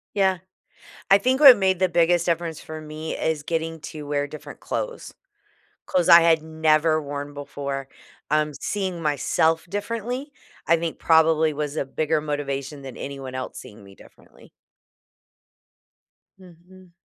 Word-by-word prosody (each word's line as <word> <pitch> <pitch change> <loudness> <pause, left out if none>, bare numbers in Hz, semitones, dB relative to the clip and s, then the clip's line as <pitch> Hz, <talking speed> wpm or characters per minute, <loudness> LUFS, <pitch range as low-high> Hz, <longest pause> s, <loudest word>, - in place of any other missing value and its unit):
Yeah. 190 -2 +2 0.7
I 195 - +8
think 255 +6 +1
what 270 -5 +10
made 190 -2 +1
the 185 0 +2
biggest 170 0 +2
difference 170 -2 -2
for 155 0 -8
me 155 +1 -6
is 160 -2 -1
getting 165 +1 -3
to 150 -1 -8
wear 145 0 -1
different 150 +1 -11
clothes. - - -5 0.7
Clothes 180 -1 +1
I 170 0 +10
had 165 -1 +3
never 155 0 +2
worn 145 0 -6
before. 140 -1 -5 0.4
Um, 150 0 +1
seeing 190 -4 -3
myself 160 +2 +1
differently, 230 - -4 0.4
I 170 - +5
think, 165 -1 -4
probably, 160 -1 +3
was 150 0 -4
a - - -1
bigger 155 +3 -1
motivation 145 -1 -4
than 135 -2 -9
anyone 135 -2 -7
else 130 0 -6
seeing 105 - -12
me 100 0 -15
differently. - - -19 1.9
Mhm. 180 0 -18
160 Hz, 140 wpm, -23 LUFS, 145-175 Hz, 1.9 s, what